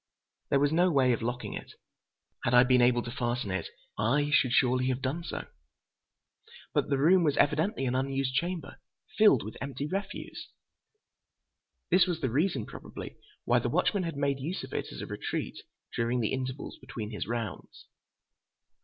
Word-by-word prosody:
There 140 - +4
was 145 +1 +3
no 175 +3 +4
way 130 -6 +4
of 115 - -2
locking 120 +2 -3
it. - - -8 0.7
Had 120 - +2
I 125 - +9
been 125 -1 +4
able 120 0 +4
to 120 - -6
fasten 120 -4 -2
it, 95 -3 -2 0.3
I 140 +7 +2
should 130 -5 +4
surely 125 +1 +3
have 130 -1 0
done 140 +6 -2
so; - - -5 1.3
but - - +1
the 140 - +2
room 170 +6 +5
was 145 -3 +2
evidently 160 +2 +2
an 125 - 0
unused 135 0 0
chamber, 175 +4 -3 0.4
filled 210 - +6
with 110 - -7
empty 140 +1 -4
refuse. 195 +6 -5 1.4
This 185 +1 +6
was 175 -3 -1
the 130 -7 -1
reason, 160 +10 +1
probably, - - -9 0.3
why - - +4
the - - -1
watchman 200 - +2
had 165 -4 -3
made 140 -1 0
use 160 +8 -3
of - - -9
it - - -3
as - - -7
a - - -4
retreat - - -4 0.4
during 120 +2 +1
the 110 - 0
intervals 130 0 -4
between 115 -4 -6
his 100 -4 -4
rounds. 115 -4 -5
135 Hz, 170 wpm, -29 LUFS, 120-155 Hz, 1.4 s, I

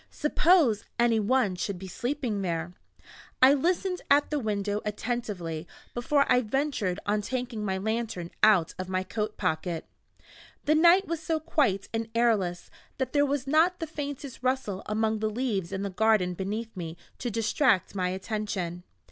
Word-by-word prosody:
Suppose 300 - +3
any 235 -2 +3
one 215 -2 +2
should 190 +1 -3
be 190 +1 -8
sleeping 240 0 -2
there! 170 -1 -2 0.7
I 260 +2 +8
listened 360 +5 0
at 290 +1 +4
the 300 - +1
window 205 -3 -1
attentively 210 -7 -3 0.3
before 280 +4 +2
I 250 0 +4
ventured 230 -6 -1
on 210 +1 +1
taking 245 -1 -3
my 190 -2 -1
lantern 220 -4 -3
out 195 -6 +5
of 185 0 -4
my 185 0 0
coatpocket. 185 -5 -2 0.8
The 305 - +4
night 345 +5 +6
was 335 -1 -3
so 320 0 -1
quite 285 -11 +1
and 225 0 -2
airless 210 -7 +1 0.3
that 260 -1 -2
there 290 -1 +4
was 280 -1 -1
not 320 +6 +3
the 325 - -2
faintest 285 -3 -6
rustle 255 -7 -1
among 220 0 0
the 215 0 0
leaves 215 -6 -2
in 195 0 -3
the 200 - -3
garden 210 -2 +2
beneath 210 +5 -4
me 170 -2 -6 0.2
to 245 - -2
distract 225 - +2
my 185 -2 0
attention. 190 -3 -3
220 Hz, 155 wpm, -28 LUFS, 190-270 Hz, 0.8 s, I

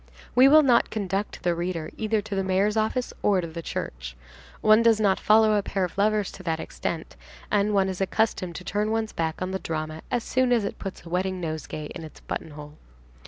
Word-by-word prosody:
We 255 +2 +7
will 305 +2 +7
not 245 -4 +4
conduct 200 -1 -3
the 175 - +2
reader 170 -2 -3
either 220 -1 0
to 205 - -6
the 195 0 0
mayor's 190 +3 +1
office 220 +3 0
or 200 -2 +3
to 175 - -2
the 165 0 -6
church. - - -5 0.4
One 215 +1 +6
does 230 -2 +4
not 200 -3 +2
follow 215 0 +5
a 205 - +3
pair 195 -1 -2
of 180 - -3
lovers 210 0 +1
to - - -11
that 165 -3 -2
extent, 160 0 -5 0.4
and 205 0 +2
one 195 -2 +3
is 190 0 -4
accustomed 190 -3 0
to - - -7
turn 210 +3 -1
one's 220 0 -1
back 160 +2 -2
on 185 - -3
the 190 - -2
drama 155 -1 -4
as 240 -2 -1
soon 255 -1 +1
as 230 -4 +3
it - - -5
puts 195 -2 -7
a - - -9
wedding 185 +1 -1
nosegay 155 -2 -5
in 170 - -7
its 155 - -11
buttonhole. 150 -1 -7
195 Hz, 215 wpm, -26 LUFS, 170-215 Hz, 0.4 s, We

